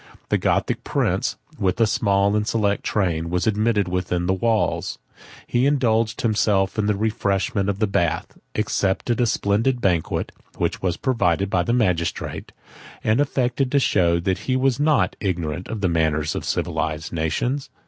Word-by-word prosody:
The - - +2
Gothic - - 0
prince, - - 0 0.2
with 95 +2 0
a 115 - +5
small 100 -2 +2
and 105 0 0
select 105 -3 0
train, 85 -5 0
was 90 +1 0
admitted 110 -2 +1
within 90 -1 -1
the 95 - +2
walls; 110 +3 0 0.5
he 125 +3 +1
indulged 115 -5 +1
himself 105 -3 +1
in 105 - +1
the 105 - +2
refreshment 100 0 0
of 100 - -1
the 110 - +2
bath, 85 -5 -1 0.2
accepted 105 +2 0
a 120 - +3
splendid 110 +5 +1
banquet, 90 -7 0 0.3
which - - -1
was 90 -3 -1
provided 100 - +1
by 90 - +2
the 100 - -1
magistrate, 90 -9 -1 0.5
and 110 +6 +3
affected 130 -2 0
to - - +4
show 85 -9 +2
that 95 +2 -1
he 130 - +3
was 130 -1 +1
not 145 -11 +2
ignorant 90 -3 -2
of 110 -3 -5
the 95 - +2
manners 80 -2 +1
of - - -4
civilized 80 -1 -2
nations. 120 - -1
100 Hz, 160 wpm, -22 LUFS, 90-115 Hz, 0.5 s, a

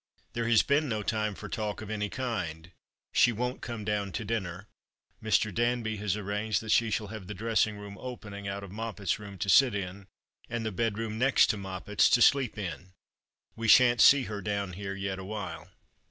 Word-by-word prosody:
There 115 -1 -1
has 115 -2 +5
been 145 +1 +1
no 110 -2 -2
time 105 -1 -1
for - - -8
talk 105 -3 -3
of 110 -1 -7
any 105 -1 -2
kind. 90 -11 -4 0.4
She 120 - +5
won't 125 +3 -3
come 115 -3 -6
down 105 -2 -1
to 110 - -3
dinner. 100 -3 -3 0.5
Mr. 110 -1 +1
Danby 120 0 0
has 105 -1 -1
arranged 105 +1 -1
that 110 - -3
she 115 -1 +4
shall 105 -2 -2
have 110 -4 -8
the 105 - -6
dressing 110 0 +1
room 100 0 -9
opening 105 -5 -7
out 100 0 -4
of 100 - -9
Moppet's 105 -3 -3
room 100 -2 -9
to 95 - -3
sit 120 +4 +6
in, 95 0 -5 0.4
and 120 -1 -3
the 110 - -1
bedroom 110 +1 -2
next 135 +2 +4
to - - -4
Moppet's 95 +1 +1
to 120 - +4
sleep 135 -7 +3
in. 90 -2 -6 0.6
We 115 0 -3
shan't 120 0 +6
see 140 -1 +7
her 105 -3 -5
down 100 -1 -2
here 100 +1 -5
yet 95 -1 -3
awhile." 105 +2 -6
105 Hz, 195 wpm, -29 LUFS, 100-115 Hz, 0.6 s, see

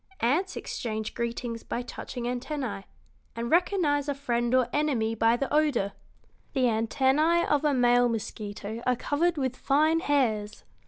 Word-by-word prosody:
Ants 315 +11 +1
exchange 220 -2 -4
greetings 235 0 -3
by 245 - -4
touching 245 0 -7
antennæ, 245 -4 -3 0.5
and 235 +1 -4
recognize 325 -5 +2
a 285 - -1
friend 240 -4 -1
or 255 - +5
an 240 - -8
enemy 265 -7 +1
by 225 +1 +3
the 275 - -3
odor. 285 -10 +2 0.6
The 265 -3 +1
antennæ 265 +8 +2
of 295 0 +2
a 295 -2 +2
male 245 -1 +4
mosquito 215 0 -5
are 250 - +3
covered 320 +7 0
with 260 -3 -1
fine 310 +5 +2
hairs. 225 -9 0
250 Hz, 150 wpm, -27 LUFS, 230-290 Hz, 0.6 s, or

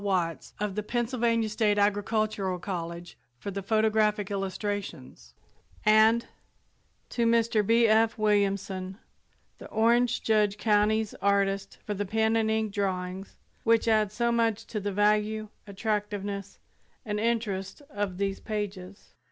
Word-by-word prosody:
Watts 180 -5 -1
of 210 -1 -2
the 210 - -2
Pennsylvania 230 0 0
State 210 -1 +1
Agricultural 205 -1 0
College, 170 -1 -6 0.2
for 200 - -6
the 200 +1 -4
photographic 215 0 +1
illustrations, 195 - -5 0.5
and 220 +2 +5 0.8
to 235 -1 0
Mr. 230 -2 +3
B. 230 +3 +4
F. 225 +1 +3
Williamson, 200 -3 0 0.6
the - - -9
Orange 235 +2 +2
Judd 210 -2 +2
Co.'s 210 0 +2
artist, 200 -1 +1
for 210 - -2
the 205 0 -3
pen 220 +2 +1
and 220 -1 +2
ink 220 -2 0
drawings 190 -1 -3 0.3
which 230 0 +3
add 215 -3 +3
so 235 +2 0
much 230 -2 +1
to 215 - -4
the 205 0 -3
value, 210 +1 +1 0.2
attractiveness 205 -1 -3 0.5
and 210 -1 -2
interest 215 -1 -2
of 205 -5 -3
these 195 0 -1
pages. 200 -3 -6
210 Hz, 125 wpm, -28 LUFS, 195-220 Hz, 0.8 s, and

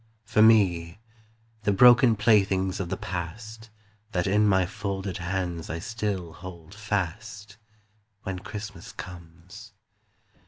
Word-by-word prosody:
For 105 0 +2
me, 95 -7 +4 0.6
the 105 - +1
broken 120 +3 +6
playthings 100 -3 +2
of 90 -3 -3
the - - -2
past 110 +6 -6 0.4
That 90 -1 0
in 105 +2 +3
my 95 -2 +3
folded 95 -1 -4
hands 85 -1 -3
I 80 - -3
still 95 -3 -4
hold 85 -1 -11
fast, 105 0 -4 0.7
When 95 -2 -4
Christmas 105 -1 -8
comes. 90 +4 -11
95 Hz, 115 wpm, -26 LUFS, 90-105 Hz, 0.7 s, broken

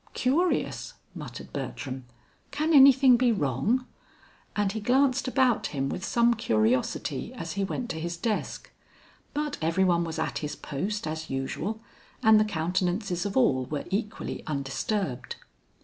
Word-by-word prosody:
"Curious!" 320 +8 0 0.2
muttered - - -9
Bertram. 130 -2 -5 0.4
"Can 305 +3 0
anything 270 -2 +8
be 245 -1 +3
wrong?" 195 - 0 0.7
And 205 -2 +1
he 220 - -3
glanced 260 +4 +2
about 255 -3 +2
him 135 -2 -2
with 180 - -4
some 235 +2 +3
curiosity 125 - 0
as 165 -7 -5
he 200 - -1
went 240 +5 -3
to 160 - -4
his 170 +1 -4
desk. 215 +4 -3 0.6
But 295 -1 -2
every 165 +4 +2
one 170 -2 +3
was 165 -1 -4
at 160 - -2
his 150 -1 -4
post 195 +9 -3
as 160 0 -4
usual 135 +11 -3 0.4
and 220 -1 +7
the 215 - +3
countenances 180 +1 -1
of 200 - -3
all 130 0 +3
were 145 +2 -4
equally 210 +2 -3
undisturbed. 140 - -2
195 Hz, 145 wpm, -27 LUFS, 150-240 Hz, 0.7 s, anything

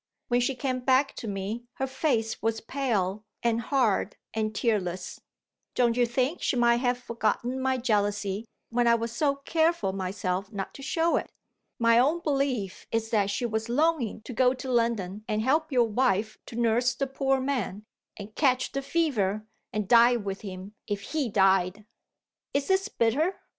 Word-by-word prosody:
When 245 0 +3
she 260 +2 0
came 255 0 -2
back 260 +2 +2
to 230 - -5
me, 205 +4 -4
her 265 - -2
face 260 -5 -1
was 225 0 0
pale 215 -6 -1 0.2
and 235 -1 +2
hard 230 -6 +1 0.2
and 215 -1 -2
tearless. 190 -6 -1 0.5
Don't 240 -2 +3
you 245 -1 +3
think 255 +7 0
she - - +1
might 235 -1 +4
have 245 0 +1
forgotten 240 +1 -2
my 260 0 +1
jealousy, 205 -3 0 0.2
when 240 0 +2
I 235 - +6
was 230 0 -3
so 280 +4 +1
careful 320 - +1
myself 190 0 -3
not 195 -3 -5
to - - -10
show 330 +5 +1
it? - - -3 0.5
My 230 0 +5
own 295 +7 +3
belief 275 - -1
is 225 0 -1
that 205 -3 +2
she 205 +4 -1
was 220 0 -2
longing 285 -4 +1
to 250 - -7
go 255 +2 +3
to 260 0 -5
London, 220 -5 0
and 215 0 0
help 310 +5 +1
your 245 -3 +3
wife 215 -2 0
to - - -9
nurse 240 +1 +2
the 275 - -1
poor 270 0 0
man, 245 -7 -2 0.3
and 210 +1 -9
catch 255 -2 +2
the 275 - -2
fever, 220 - 0 0.3
and 210 -2 -2
die 240 +2 +6
with 200 -4 -4
him 190 0 -8
if 205 -1 -2
he 295 -6 0
died. 195 0 +2 0.7
Is 280 +4 0
this 385 +2 +2
bitter? 290 - +1
235 Hz, 175 wpm, -27 LUFS, 210-265 Hz, 0.7 s, I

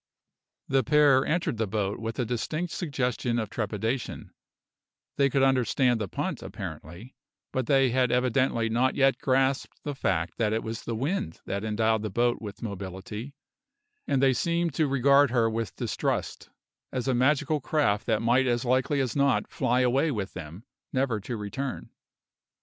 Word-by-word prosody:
The 135 -1 +2
pair 145 -2 +5
entered 165 -5 0
the 110 -1 0
boat 100 0 -2
with 115 0 -4
a 125 - 0
distinct 155 +9 -3
suggestion 125 -7 -1
of 110 -3 -2
trepidation; 110 +3 -3 0.9
they 140 -1 +4
could 135 +1 +2
understand 125 -2 +2
the 105 - -2
punt, - - -3
apparently, 90 - -8 0.4
but 130 -2 -1
they 135 -3 +4
had 125 -1 +2
evidently 125 -1 +1
not 120 +4 +1
yet 135 0 +3
grasped 135 +1 0
the 145 - -3
fact 80 -10 -1
that 110 -2 +1
it 110 - -1
was 110 0 -5
the 115 - -2
wind 135 - -2
that 100 +1 -3
endowed 110 0 +1
the 110 - -3
boat 120 +4 +1
with 105 -1 -8
mobility, 100 +5 -6 0.7
and 135 -1 +1
they 135 -1 +5
seemed 170 +4 0
to 155 +1 +1
regard 140 +1 +4
her 115 -2 +2
with 115 -3 -3
distrust, - - -2 0.4
as 130 0 -3
a 130 - +2
magical 145 +4 +2
craft 125 -9 +1
that 110 -1 +1
might 125 +3 +3
as 120 0 0
likely 130 +3 +1
as 130 -3 -2
not 140 -1 +2
fly 125 -1 +1
away 130 +5 +2
with 105 -8 -3
them, 85 +4 -8 0.3
never 130 -4 0
to 115 +4 -5
return. 130 +6 -5
125 Hz, 165 wpm, -27 LUFS, 110-135 Hz, 0.9 s, pair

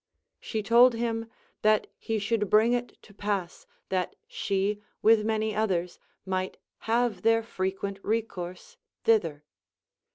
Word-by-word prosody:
She 220 -2 -3
told 235 +3 +6
him, 230 -1 -2 0.3
that 215 0 +4
he 225 - -2
should 210 -1 0
bring 220 +3 +5
it 245 0 -2
to 205 - -16
pass 200 -3 -3 0.2
that 185 -1 -1
she 200 +1 -1 0.2
with 220 -1 +6
many 220 0 0
otliers 180 -5 -1 0.3
might 185 0 -2 0.3
have 230 -4 +2
their 225 +1 +3
frequent 195 -1 -3
recourse 185 -5 -3 0.3
thither. 165 -10 +2
215 Hz, 125 wpm, -28 LUFS, 190-225 Hz, 0.3 s, told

